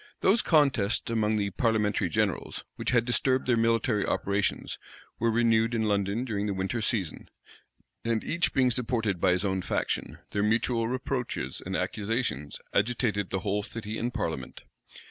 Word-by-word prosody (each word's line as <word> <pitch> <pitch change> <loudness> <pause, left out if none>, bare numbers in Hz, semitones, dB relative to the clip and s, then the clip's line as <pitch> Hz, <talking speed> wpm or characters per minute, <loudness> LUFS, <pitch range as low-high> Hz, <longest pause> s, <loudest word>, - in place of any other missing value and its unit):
Those 205 +5 +4
contests 130 - +2
among 110 -1 +1
the 100 -1 -1
parliamentary 105 -3 +1
generals, 105 -1 -1
which - - -3
had 120 -1 +3
disturbed 130 +1 +2
their 125 - +3
military 115 -1 +2
operations, 100 0 -1 0.4
were 115 - +2
renewed 115 0 +3
in 110 - +1
London 100 +3 0
during 105 -4 -2
the 100 - -1
winter 95 +5 -2
season; 105 -7 -2 0.7
and 115 -1 0
each 170 +1 +1
being 130 -2 +3
supported 115 -6 0
by - - +4
his 90 +3 0
own 95 -1 0
faction, - - -2
their 100 - 0
mutual 115 +2 +1
reproaches 125 - -3
and 95 +1 -3
accusations 95 - -2
agitated 105 -3 +1
the 95 - -2
whole 105 +1 0
city 110 0 -5
and 120 +2 -1
parliament. 65 - -4
110 Hz, 155 wpm, -28 LUFS, 100-120 Hz, 0.7 s, Those